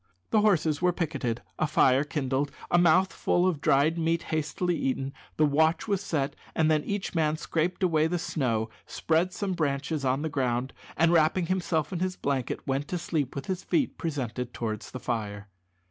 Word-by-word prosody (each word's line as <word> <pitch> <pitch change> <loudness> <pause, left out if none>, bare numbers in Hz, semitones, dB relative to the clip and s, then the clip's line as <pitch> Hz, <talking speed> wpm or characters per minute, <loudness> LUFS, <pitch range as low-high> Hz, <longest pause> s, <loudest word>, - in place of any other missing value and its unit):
The 215 - +4
horses 165 -8 +2
were 180 0 +4
picketed, 140 -9 -2 0.2
a 155 - +2
fire 135 -2 +4
kindled, 140 -1 -1 0.2
a 175 - +5
mouthful 175 +1 +3
of 170 -6 0
dried 155 +5 +3
meat 165 +1 +1
hastily 160 +3 0
eaten, 135 -2 -2 0.2
the 155 - +5
watch 160 +8 +2
was 200 -2 0
set, 145 -7 -1 0.2
and 160 0 +3
then 155 -1 +2
each 200 -1 -3
man 155 -2 +1
scraped 170 +3 -1
away 160 -3 +3
the 175 +2 -1
snow, 130 -10 -1 0.2
spread 165 +3 +1
some 195 0 -2
branches 145 -2 -1
on 135 +2 +1
the - - 0
ground, 130 -3 -1 0.2
and 165 +2 +4
wrapping 170 +2 +3
himself 170 -3 -1
in 175 - -2
his 185 0 -1
blanket, 135 -6 -2
went 135 +2 -1
to 180 - -2
sleep 155 -6 -2
with 140 -1 -4
his 190 -1 -3
feet 295 -5 0
presented 125 -6 -3
towards 110 -2 -4
the 130 - -7
fire. 105 -5 -4
155 Hz, 180 wpm, -28 LUFS, 135-175 Hz, 0.2 s, a